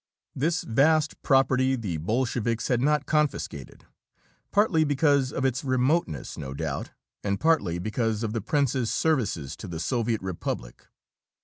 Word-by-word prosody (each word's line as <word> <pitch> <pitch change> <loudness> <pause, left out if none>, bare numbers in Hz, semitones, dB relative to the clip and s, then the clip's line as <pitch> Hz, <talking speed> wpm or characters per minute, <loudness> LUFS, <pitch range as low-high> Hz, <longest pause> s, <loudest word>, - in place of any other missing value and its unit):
This 165 +6 0
vast 150 +5 +2
property 135 -1 +3
the 100 -9 -3
Bolsheviks 115 +5 -1
had 120 -2 +2
not 150 +1 +2
confiscated, 150 - -2 0.6
partly 200 -6 +3
because 145 -2 +2
of 130 - -2
its 130 -1 0
remoteness, 130 - 0
no 65 -1 -6
doubt, 70 -2 -3 0.3
and 100 -1 -1
partly 150 - +2
because 110 +3 -1
of 110 -1 -2
the 115 - -1
prince's 130 -1 0
services 115 - 0
to - - -8
the 85 -2 -5
Soviet 115 +4 -1
Republic. 85 -10 -5
125 Hz, 135 wpm, -26 LUFS, 100-145 Hz, 0.6 s, property